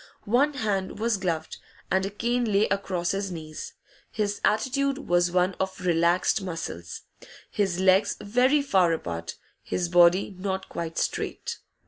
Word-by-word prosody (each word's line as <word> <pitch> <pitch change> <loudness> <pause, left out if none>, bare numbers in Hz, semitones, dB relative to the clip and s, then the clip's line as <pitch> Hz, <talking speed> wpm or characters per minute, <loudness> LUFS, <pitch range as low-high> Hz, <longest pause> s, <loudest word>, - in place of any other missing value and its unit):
One 275 +7 +2
hand 205 -7 -2
was 225 0 +1
gloved, 165 -4 -3 0.3
and 190 0 +2
a 195 - -1
cane 235 +2 -1
lay 200 +2 +3
across 185 -3 -1
his 195 0 -2
knees. 155 -2 -7 0.4
His 205 -2 -2
attitude 265 +5 +1
was 175 0 +3
one 180 +1 +2
of 190 0 -2
relaxed 175 +2 +2
muscles, 165 - -6 0.5
his 190 -4 0
legs 190 +2 +3
very 255 +7 +2
far 185 -10 +3
apart, 85 - -4 0.3
his 175 -1 -2
body 175 +3 +4
not 190 0 -3
quite 165 -1 -5
straight. - - -2
190 Hz, 140 wpm, -26 LUFS, 175-210 Hz, 0.5 s, body